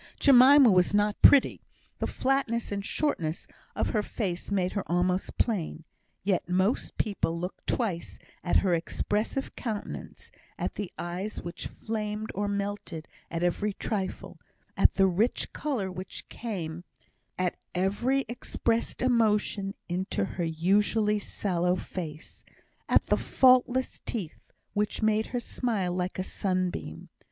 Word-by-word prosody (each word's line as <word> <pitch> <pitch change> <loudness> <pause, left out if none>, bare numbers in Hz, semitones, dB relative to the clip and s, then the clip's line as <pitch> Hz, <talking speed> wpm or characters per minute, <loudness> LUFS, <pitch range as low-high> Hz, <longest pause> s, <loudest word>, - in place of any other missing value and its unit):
Jemima 270 -1 +8
was 180 +1 +3
not 205 0 +1
pretty; 280 - +6 0.4
the - - 0
flatness 255 -4 0
and 200 0 -2
shortness 175 - -1 0.3
of - - 0
her 215 - +2
face 185 -5 -3
made 185 -2 +1
her 200 - -1
almost 180 +2 0
plain; 180 -8 -1 0.4
yet 190 -3 0
most 185 +6 +1
people 170 -5 -1
looked 180 +2 -6
twice 195 -9 -1 0.3
at 175 - 0
her 180 - +3
expressive 210 +9 -1
countenance, 220 -5 -6 0.3
at - - -2
the 205 -4 -5
eyes 180 +5 -4
which 170 +1 -6
flamed 215 -1 -4
or 205 +2 -1
melted 200 -5 -3 0.2
at 165 +1 -2
every 200 +4 0
trifle, 195 -1 -4 0.4
at - - +4
the 195 - +5
rich 195 +6 +1
colour 245 -11 -2
which 185 +1 -8
came 175 -7 -5 0.5
at 185 -1 0 0.2
every 235 +9 +1
expressed 235 0 -2
emotion 210 -5 +2
into 180 - -1
her 175 - -4
usually 205 +6 +2
sallow 180 -3 0
face, 160 -5 -7 0.5
at - - +4
the - - +2
faultless 255 0 +3
teeth 195 -10 -5 0.2
which 210 +1 -1
made 220 0 +2
her 245 - -2
smile 215 -7 -1
like 180 +1 -2
a 185 - -1
sunbeam. 185 - -2
200 Hz, 130 wpm, -28 LUFS, 180-225 Hz, 0.5 s, Jemima